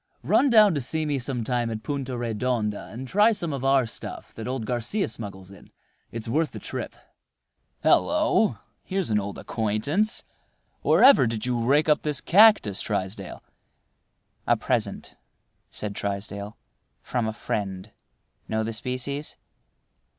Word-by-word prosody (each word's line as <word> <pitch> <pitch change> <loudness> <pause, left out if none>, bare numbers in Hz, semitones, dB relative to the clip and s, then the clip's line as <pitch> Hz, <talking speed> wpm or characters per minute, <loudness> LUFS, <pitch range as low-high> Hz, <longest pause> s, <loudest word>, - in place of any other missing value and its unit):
Run 280 - +3
down 215 -5 +6
to 145 - -1
see 155 +5 -1
me 145 -2 -1
some 125 -2 -2
time 120 0 -1
at 110 -1 -5
Punta 135 -3 -3
Redonda, 115 -4 -2
and 125 +5 -7
try 210 - +4
some 170 -8 -2
of 135 -2 -4
our 135 -1 +3
stuff 110 - -7
that 110 - -7
old 130 -3 -3
Garcia 125 - -1
smuggles 100 -3 -8
in. 100 - -15 0.4
It's 115 -1 -6
worth 155 +7 0
the - - -6
trip. - - -5 0.9
Hallo! 305 -8 +3 0.3
here's 190 - -1
an 105 - +3
old 100 0 -5
acquaintance. 120 - 0 0.6
Wherever 265 - +6
did 110 0 -3
you 120 -2 -1
rake 145 +6 +3
up 150 -1 +3
this 150 -2 0
cactus, 200 - +5
Trysdale?" 95 -1 -4 1.0
"A - - +4
present," - - -2 0.5
said 105 -1 -4
Trysdale, 100 +1 -5 0.5
"from 120 -3 -1
a - - -1
friend. 100 -2 -4 0.6
Know 110 0 -1
the 115 +1 -3
species?" 130 +6 -4
120 Hz, 145 wpm, -25 LUFS, 110-150 Hz, 1.0 s, down